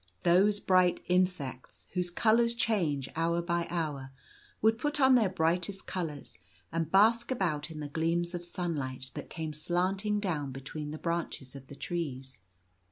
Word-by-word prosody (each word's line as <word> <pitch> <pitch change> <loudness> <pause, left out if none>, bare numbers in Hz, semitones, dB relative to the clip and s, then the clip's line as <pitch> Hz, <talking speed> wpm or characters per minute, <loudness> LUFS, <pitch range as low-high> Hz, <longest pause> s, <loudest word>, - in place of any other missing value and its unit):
Those 195 +4 +4
bright 185 -2 +3
insects, 180 -8 -1
whose 180 -1 0
colours 230 +5 +3
change 170 - 0
hour 165 +1 +1
by 170 0 -1
hour, 150 -6 -3 0.5
would 225 +1 +3
put 295 0 -1
on 265 -1 +6
their 225 -6 +5
brightest 180 +2 0
colours, 155 - -5 0.3
and 165 -1 -2
bask 225 +4 +5
about 170 - -1
in 155 -2 -7
the 145 - -4
gleams 165 +3 0
of 175 -1 -4
sunlight 145 -8 -4
that - - -7
came 160 -1 -4
slanting 190 +6 0
down 155 -9 -2
between 140 +3 -6
the 155 - -5
branches 170 -6 -3
of 135 -1 -10
the 140 - -10
trees. 135 - -4
170 Hz, 155 wpm, -30 LUFS, 150-190 Hz, 0.5 s, on